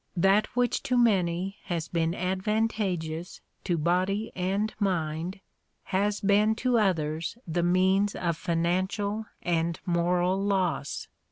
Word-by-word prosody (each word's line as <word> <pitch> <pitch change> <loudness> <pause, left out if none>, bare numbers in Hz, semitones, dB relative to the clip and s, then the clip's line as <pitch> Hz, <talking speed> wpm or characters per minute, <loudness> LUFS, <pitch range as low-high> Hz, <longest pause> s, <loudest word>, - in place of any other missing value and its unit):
That 195 +4 +4
which 245 -1 +1
to 250 - 0
many 190 -4 +2
has 170 -2 -2
been 165 0 0
advantageous 185 -3 -1 0.3
to 175 -3 +1
body 185 +6 0
and 195 +4 -1
mind 175 -1 -1 0.4
has 200 +2 0
been 210 +2 +3
to 245 0 +2
others 165 -2 0
the 170 +1 -1
means 190 +3 +3
of 170 -2 -1
financial 185 +6 -1 0.2
and 170 -1 0
moral 180 +2 +1
loss. 185 -8 -1
185 Hz, 115 wpm, -28 LUFS, 170-205 Hz, 0.4 s, That